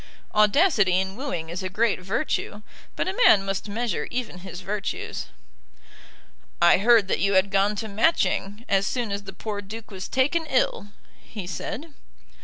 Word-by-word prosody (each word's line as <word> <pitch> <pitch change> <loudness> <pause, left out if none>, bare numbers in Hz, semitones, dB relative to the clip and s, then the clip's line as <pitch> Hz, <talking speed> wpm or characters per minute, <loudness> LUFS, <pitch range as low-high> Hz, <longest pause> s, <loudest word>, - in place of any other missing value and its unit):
Audacity 210 - +4
in 190 0 -3
wooing 195 - -4
is 175 +3 -4
a 185 - -3
great 220 +3 +1
virtue, 205 +1 -2 0.3
but - - -1
a 375 - -2
man 195 -2 +6
must 195 +1 -3
measure 225 -1 -2
even 240 -7 -4
his 185 0 -8
virtues. 200 +2 -4 1.3
"I 175 +1 +6
heard 225 -1 +5
that - - 0
you 200 0 +2
had 190 +1 +3
gone 200 +2 +2
to 220 +2 -4
Matching, 215 -2 0
as 195 0 +2
soon 240 -5 -2
as 200 0 -4
the 195 - -7
poor 205 +1 -5
Duke 220 +3 -9
was 190 -1 -6
taken 295 +5 +1
ill," 255 -6 0 0.3
he 205 -5 -8
said. 270 - -6
205 Hz, 165 wpm, -25 LUFS, 190-235 Hz, 1.3 s, man